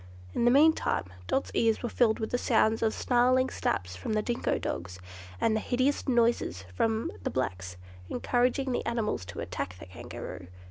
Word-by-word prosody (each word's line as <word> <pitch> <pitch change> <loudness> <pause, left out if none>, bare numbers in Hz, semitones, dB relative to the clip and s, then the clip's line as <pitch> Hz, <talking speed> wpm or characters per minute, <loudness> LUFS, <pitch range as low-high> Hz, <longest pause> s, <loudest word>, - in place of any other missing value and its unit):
In 235 - +1
the - - +7
meantime 305 +5 +4 0.2
Dot's 270 - 0
ears 225 0 +2
were - - 0
filled 230 -2 +2
with 220 - -4
the 245 - +1
sounds 220 -2 +2
of 220 -1 +2
snarling 255 +2 +2
snaps 90 0 -2
from 90 - -4
the 215 0 +1
dingo 240 +1 0
dogs, 90 +1 -4 0.4
and 220 -1 +2
hideous 260 +5 0
noises 235 - +2
from 220 - 0
the - - -2
blacks, 90 -8 -3 0.3
encouraging 250 - +1
the - - -1
animals 225 - -1
to 85 - -7
attack 90 +1 -4
the - - -10
Kangaroo. 90 -1 -8
225 Hz, 170 wpm, -29 LUFS, -, 0.4 s, the